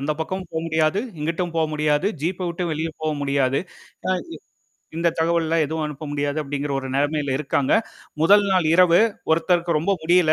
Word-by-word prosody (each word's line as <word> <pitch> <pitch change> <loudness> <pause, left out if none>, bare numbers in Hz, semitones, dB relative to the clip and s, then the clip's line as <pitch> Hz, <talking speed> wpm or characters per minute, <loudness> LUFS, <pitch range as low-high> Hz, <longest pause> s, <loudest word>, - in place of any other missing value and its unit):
அந்தப் 150 +2 -2
பக்கம் 185 +4 -3
போக 160 - -2
முடியாது. 160 +3 +1 0.2
இங்கிட்டும் 165 +3 -2
போக 160 - +3
முடியாது. 150 +3 +1 0.2
ஜீப் 180 +3 -2
விட்டு 175 +1 -3
வெளிய 160 +2 -2
போக 155 - 0
முடியாது. 140 -1 +1 0.5
அ, - - +2 0.2
இ - - -7 0.6
இந்தத் 170 0 0
தகவல்லாம் 165 -1 +2
எதுவும் 160 +1 -3
அனுப்ப 150 0 -7
முடியாது 145 +1 -1
அப்படிங்கிற 145 0 -3
ஒரு 135 - -6
நிலைமையில 145 -1 0
இருக்காங்க. 140 -2 0 0.5
முதல் 205 +5 +6
நாள் 180 -4 +2
இரவு 175 0 +6 0.3
ஒருத்தருக்கு 170 0 +2
ரொம்ப 190 +6 +1
முடியல. 170 -1 +4
160 Hz, 170 wpm, -22 LUFS, 145-170 Hz, 0.6 s, முதல்